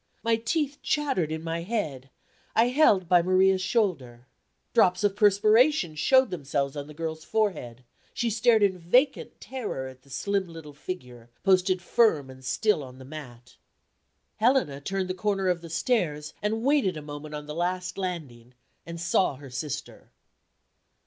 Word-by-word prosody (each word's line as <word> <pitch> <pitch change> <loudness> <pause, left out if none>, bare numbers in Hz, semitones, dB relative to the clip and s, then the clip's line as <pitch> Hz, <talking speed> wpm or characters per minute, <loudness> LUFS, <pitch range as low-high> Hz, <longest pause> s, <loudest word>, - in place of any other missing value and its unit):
My 230 0 +3
teeth 285 +5 -2
chattered 270 - 0
in 160 0 -4
my 165 0 -3
head; 155 - -3 0.5
I 230 +2 +4
held 230 - +4
by 175 0 +5
Maria's 185 +1 +3
shoulder. 160 - -1 0.5
Drops 185 -4 +3
of 205 -1 +2
perspiration 215 - +4
showed 260 - +3
themselves 140 -4 -2
on 145 -1 -5
the 150 - -12
girl's 160 0 -4
forehead; 175 - -2 0.3
she 235 -1 -1
stared 225 0 +3
in 190 -2 +2
vacant 250 - +1
terror 220 - -5
at 130 0 -12
the 140 - -23
slim 190 +8 -1
little 165 -3 -10
figure, 125 -7 -8
posted 185 -1 +3
firm 165 - +2
and 130 0 -14
still 210 +7 +1
on 130 -1 -11
the 130 - -12
mat. 130 -5 -11 0.8
Helena 220 - +2
turned 190 +4 -2
the 185 - -2
corner 195 0 0
of 175 -2 0
the 170 - -10
stairs, 160 -6 -1
and 220 +2 -1
waited 265 - +2
a 150 - -7
moment 150 +1 -8
on 150 0 -6
the 150 - -6
last 180 +2 -2
landing, 140 -11 -6 0.3
and 170 0 -6
saw 170 -2 +1
her 135 -1 -12
sister. 135 +2 -6
180 Hz, 160 wpm, -27 LUFS, 145-215 Hz, 0.8 s, by